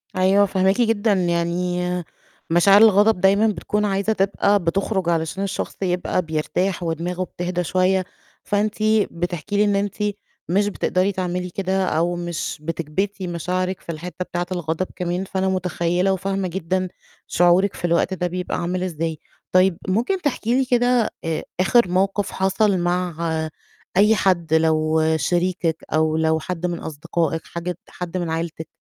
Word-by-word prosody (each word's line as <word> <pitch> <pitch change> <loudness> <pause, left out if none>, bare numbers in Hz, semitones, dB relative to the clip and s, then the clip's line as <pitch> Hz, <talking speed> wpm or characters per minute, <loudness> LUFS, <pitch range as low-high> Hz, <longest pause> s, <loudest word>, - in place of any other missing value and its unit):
أيوه، 190 +2 +4
فاهماكِ 190 +3 +2
جدًا 225 -2 +2
يعني 175 0 0 0.7
مشاعر 195 +5 +6
الغضب 210 -2 +5
دايمًا 200 +3 +4
بتكون 210 +1 -1
عايزة 200 +2 +1
تبقى 200 0 +2
بتخرُج 190 +1 0
علشان 165 +3 -1
الشخص 200 - -3
يبقى 180 -1 0
بيرتاح 170 +3 -1
ودماغه 170 +2 -2
بتهدى 180 0 -3
شوية، 185 +2 +1 0.4
فأنتِ 210 +1 0 0.4
بتحكي 175 +3 -3
لي 205 - +5
إن 205 -1 +2
أنتِ 200 0 -1 0.5
مش 200 +4 +2
بتقدري 190 -1 0
تعملي 180 -1 -3
كده، 190 +1 -1
أو 175 0 0
مش 175 -2 -4
بتكبِتي 170 +5 -3
مشاعرِك 180 +2 -2
في - - -6
الحتّة 180 +3 -6
بتاعة 175 0 -3
الغضب 175 0 -2
كمان، 180 +1 -2
فأنا 190 0 -1
متخيّلة 180 0 0
وفاهمة 195 0 -2
جدًا 185 +1 -1 0.4
شعورِك 175 +3 +3
في - - -4
الوقت 170 +2 +2
ده 180 -1 -1
بيبقى 180 +1 -3
عامل 180 +1 -2
إزاي. 165 -3 -3 0.3
طيب 185 -1 +4
ممكن 240 - 0
تحكي 245 -5 0
لي 265 - +2
كده 245 -2 +2
آآ، 165 -2 -2 0.2
آخِر 190 +4 +4
موقِف 195 +2 0
حَصَل 195 +1 +2
مع 175 0 -1 0.8
أي 210 +3 +6
حد 175 -6 +1
لو 160 0 +3
شريكِك 175 +1 0
أو 155 0 +2
لو 160 0 +2
حد 180 +1 -4
من 175 -1 -2
أصدقائِك، 165 +1 -2
حاجة 170 0 -5
حد 180 0 -5
من 175 -2 -2
عيلتِك، 160 0 -4
180 Hz, 145 wpm, -22 LUFS, 170-195 Hz, 0.8 s, مشاعر